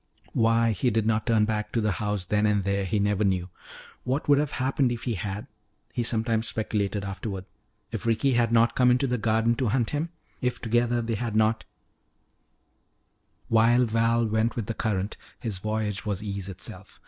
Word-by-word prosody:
Why 115 0 +3
he 110 +5 +1
did 110 -1 0
not 110 0 +1
turn 110 -2 +4
back 105 -1 -2
to 115 - +2
the 110 -1 +1
house 105 -3 -1
then 105 +3 +2
and 105 -1 +2
there 100 0 0
he 95 +3 0
never 105 0 +1
knew. 95 -2 0 0.5
What 130 +4 -1
would 145 -1 +5
have 150 -1 -1
happened 130 -1 +1
if 120 -2 -4
he 120 - -1
had? 100 +1 -4 0.5
he 120 - -1
sometimes 115 -1 0
speculated 105 -2 -1
afterward. 95 0 -5 0.5
If - - -4
Ricky 115 +4 +2
had 120 -1 +2
not 115 0 +4
come 125 -1 +5
into 125 +2 +3
the 125 -2 -1
garden 115 +2 +2
to 130 - 0
hunt 120 +1 +1
him? 150 +3 -1 0.3
If 125 0 -1
together 120 +1 +1
they 115 0 -2
had 115 0 -3
not 110 0 +2 1.8
While 115 +2 +4
Val 115 +1 +2
went 110 +1 0
with 115 - -2
the 115 - -3
current, 105 -2 -2 0.2
his 105 -6 -3
voyage 110 0 -2
was 105 -1 -3
ease 100 -2 -4
itself. 95 0 -7
110 Hz, 185 wpm, -26 LUFS, 105-120 Hz, 1.8 s, would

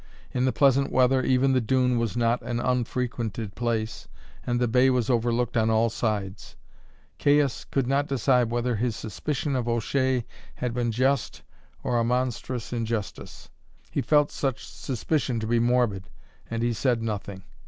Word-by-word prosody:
In 125 0 0
the 130 - +2
pleasant 140 0 +3
weather 130 +1 +3
even 130 +1 +2
the 130 - +3
dune 125 +1 +2
was 115 0 -2
not 120 0 +2
an 120 -1 -3
unfrequented 120 -4 -2
place, 115 -1 -2 0.4
and 120 0 -1
the 125 - +2
bay 125 +3 +4
was 125 -1 +1
overlooked 120 0 0
on 110 -1 +3
all 110 +1 +2
sides. 100 -5 -3 0.6
Caius 145 -3 +2
could 135 -2 -1
not 140 +3 +1
decide 125 -2 +2
whether 120 0 -1
his 115 0 -1
suspicion 140 +5 -3
of 125 -2 -1
O'Shea 125 +1 0 0.3
had 125 -2 -3
been 120 -1 0
just 130 +2 0 0.4
or 120 -1 +1
a - - +2
monstrous 125 0 -2
injustice. 115 -3 -4 0.4
He - - 0
felt 150 -1 +3
such 135 -5 -2
suspicion 130 -1 -2
to 110 - -3
be 115 +1 +2
morbid, 120 -6 +1 0.4
and 115 0 -2
he 120 0 +1
said 120 0 0
nothing. 100 -3 -4
120 Hz, 160 wpm, -26 LUFS, 115-130 Hz, 0.6 s, bay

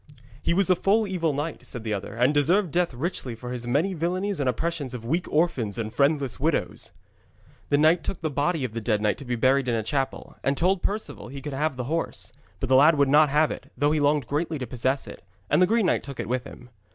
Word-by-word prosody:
'He - - 0
was 195 0 +2
a - - +6
full 205 +5 +2
evil 180 -5 0
knight,' 145 +3 -4
said 120 -3 -6
the 110 -1 -2
other, 100 +1 -5
'and 125 +5 +3
deserved 170 +5 +3
death 175 +2 +1
richly 130 -2 -3
for 125 +2 -7
his 120 -1 -4
many 155 +10 +1
villainies 185 +3 -1
and 135 -3 +1
oppressions 145 0 -2
of 115 -2 -7
weak 165 +9 -1
orphans 135 - +1
and 110 -1 -4
friendless 140 -3 +1
widows.' 155 +3 -1 0.8
The 145 - +3
knight 160 +3 +4
took 185 - -4
the 155 -2 -2
body 145 +2 0
of 125 - -2
the 115 +1 -4
dead 105 -1 +1
knight 105 0 0
to 140 - -9
be 125 -1 -1
buried 130 +3 +2
in 120 - +1
a 110 - -1
chapel, 135 +3 -3
and 140 0 +1
told 185 +2 +2
Perceval 215 +2 -4
he 140 +3 -7
could 145 0 -6
have 150 +1 -1
the 125 - -3
horse. 155 -2 -3 0.3
But 130 - -2
the 130 - +5
lad 150 +3 +6
would 140 -1 +3
not 150 +1 +6
have 150 +2 +3
it, - - -8
though 145 +3 +2
he 155 - +1
longed 145 -2 +2
greatly 155 +5 -2
to 130 - -4
possess 130 +3 -1
it, - - -11 0.3
and - - +4
the 180 - +6
green 225 0 +2
knight - - +2
took 140 -3 -9
it - - -3
with 125 +2 -1
him. 125 -2 -12
145 Hz, 250 wpm, -25 LUFS, 125-165 Hz, 0.8 s, a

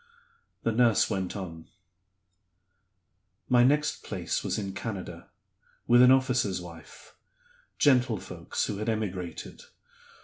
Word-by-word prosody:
The 115 - +1
nurse 115 -1 +3
went 95 -2 -2
on: 80 -4 -8 1.8
"My 120 -1 +5
next 150 +4 +1
place - - -3
was - - -2
in 100 -2 -4
Canada, 100 -4 -6 0.6
with 120 +1 +6
an 125 - +8
officer's 125 -7 +2
wife: 85 -2 -13 0.6
gentlefolks 125 -6 +1
who 105 - -4
had 110 +2 -3
emigrated. 95 -6 -4
110 Hz, 105 wpm, -28 LUFS, 95-125 Hz, 1.8 s, an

